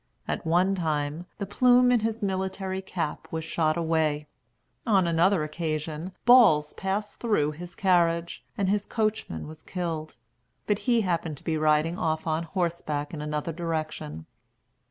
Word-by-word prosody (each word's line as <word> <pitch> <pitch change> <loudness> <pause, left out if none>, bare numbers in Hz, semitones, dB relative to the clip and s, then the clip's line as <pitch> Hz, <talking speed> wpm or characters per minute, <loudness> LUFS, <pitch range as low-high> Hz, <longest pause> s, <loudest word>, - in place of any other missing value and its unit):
At - - -3
one 180 +4 +3
time, 155 -1 -2
the 200 - -3
plume 250 +4 +5
in 245 - +4
his 225 0 -2
military 190 0 -2
cap 170 -5 -4
was 160 0 -3
shot 155 0 0
away. 160 -3 +1 0.6
On 195 -5 +4
another 170 +1 +3
occasion, 155 +2 -3
balls 225 -12 +6
passed 200 +2 -3
through 205 -11 +1
his 170 +3 -9
carriage, 170 -3 +1
and 195 - +1
his 205 +1 0
coachman 215 - -2
was 155 0 -10
killed; 165 -4 -4 0.5
but 210 -1 +1
he 235 -2 +4
happened 170 -5 -1
to - - -13
be 160 - -1
riding 155 +2 +2
off 160 0 -1
on 160 0 0
horseback 165 -5 -2
in 150 - -5
another 150 +2 -3
direction. 155 - -4
170 Hz, 150 wpm, -27 LUFS, 155-190 Hz, 0.6 s, balls